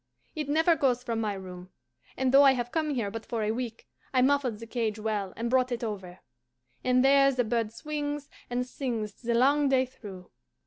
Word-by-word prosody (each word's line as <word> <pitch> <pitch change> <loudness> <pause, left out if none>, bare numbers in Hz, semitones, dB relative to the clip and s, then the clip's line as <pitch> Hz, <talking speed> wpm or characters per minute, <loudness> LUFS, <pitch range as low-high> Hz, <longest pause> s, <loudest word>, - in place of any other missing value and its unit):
It 300 -2 -3
never 320 +3 +4
goes 250 -5 +1
from 230 -3 -2
my 210 -2 -1
room, 185 -1 -9 0.5
and 260 -1 +1
though 275 +1 +8
I 275 -1 +7
have 245 -1 -3
come 310 -3 -1
here 215 -5 -1
but 225 +1 -6
for 230 -3 -3
a 210 - +1
week 230 -1 -5 0.3
I 255 - +5
muffled 265 -4 +2
the 230 - -9
cage 225 -2 -2
well 210 -3 -2
and 230 - -2
brought 255 +1 +2
it 240 0 -3
over; 190 -5 -6 0.6
and 255 +1 +3
there 275 0 +6
the 250 -2 +1
bird 230 -1 -1
swings 290 +3 -4 0.2
and 245 +1 -1
sings 235 -5 -4
the 235 -1 -2
long 280 +4 +4
day 260 -1 +3
through. 200 -7 -11
245 Hz, 205 wpm, -28 LUFS, 220-270 Hz, 0.6 s, though